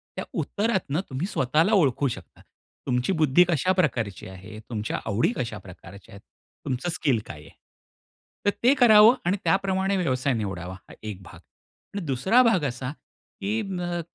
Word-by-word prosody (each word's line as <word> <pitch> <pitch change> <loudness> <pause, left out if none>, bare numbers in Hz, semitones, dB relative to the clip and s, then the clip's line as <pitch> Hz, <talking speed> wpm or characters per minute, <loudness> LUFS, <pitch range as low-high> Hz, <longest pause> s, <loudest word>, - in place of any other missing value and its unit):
त्या - - -4
उत्तरातनं 190 -7 -1
तुम्ही 135 +8 -3
स्वतःला 155 - +1
ओळखू 140 - +3
शकता. 120 - -8 0.5
तुमची 125 +7 0
बुद्धी 155 +1 +4
कशा 170 +3 +2
प्रकारची 120 - -1
आहे, 95 +3 -11
तुमच्या 110 -2 -3
आवडी 110 +2 +1
कशा 115 -4 -3
प्रकारच्या 95 +1 -14
आहेत? 100 - -13 0.4
तुमचं 130 +7 -2
स्किल 150 -8 +1
काय 75 - -9
आहे? - - -14 1.0
तर - - +5
ते 255 +3 +6
करावं 220 0 +8
आणि 185 +4 +1
त्याप्रमाणे 195 0 +1
व्यवसाय 135 -6 0
निवडावा. 95 -5 -4
हा - - -13
एक 105 -3 -6
भाग. - - -13 0.6
आणि 200 - -2
दुसरा 145 - +3
भाग 220 -9 +3
असा, 125 0 -3 0.5
की 105 +3 -1 0.2
अ, 175 -1 -2
135 Hz, 155 wpm, -25 LUFS, -, 1.0 s, करावं